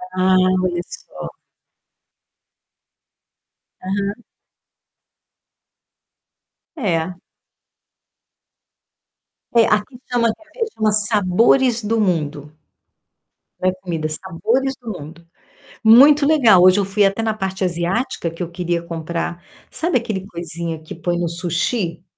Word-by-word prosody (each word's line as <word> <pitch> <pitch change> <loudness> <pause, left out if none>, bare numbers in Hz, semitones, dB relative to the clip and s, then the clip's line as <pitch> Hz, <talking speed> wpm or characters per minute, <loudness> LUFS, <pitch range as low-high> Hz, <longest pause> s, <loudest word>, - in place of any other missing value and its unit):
Ah, 185 0 +3 0.3
olha 175 -1 -1
só. - - -9 2.5
Aham. 200 +4 -3 2.5
É. 180 - -1 2.4
É, 230 - +6
aqui 215 +4 0
chama 235 -1 +2
aqui 320 - -5
chama 215 -1 +1
Sabores 215 +3 +3
do 225 +2 0
Mundo. 150 -5 -2 1.1
Não 185 - +2
é - - -2
comida, 165 -4 -3
Sabores 195 +12 -1
do 245 -2 -20
Mundo. 165 0 -10 0.6
Muito 280 +6 +7
legal, 235 - +5
hoje 185 +2 +6
eu 195 - +1
fui 200 +1 +2
até 195 +3 0
na 220 -1 0
parte 190 -2 -3
asiática, 175 +3 -1
que 165 +2 -6
eu 170 - -7
queria 175 -1 -2
comprar 170 +1 -4 0.3
sabe 335 -4 0
aquele 200 -5 -4
coisinha 170 -2 -5
que 155 - -9
põe 175 +1 -2
no 175 -1 -1
sushi? 170 +1 -2
190 Hz, 105 wpm, -20 LUFS, 170-225 Hz, 2.5 s, Muito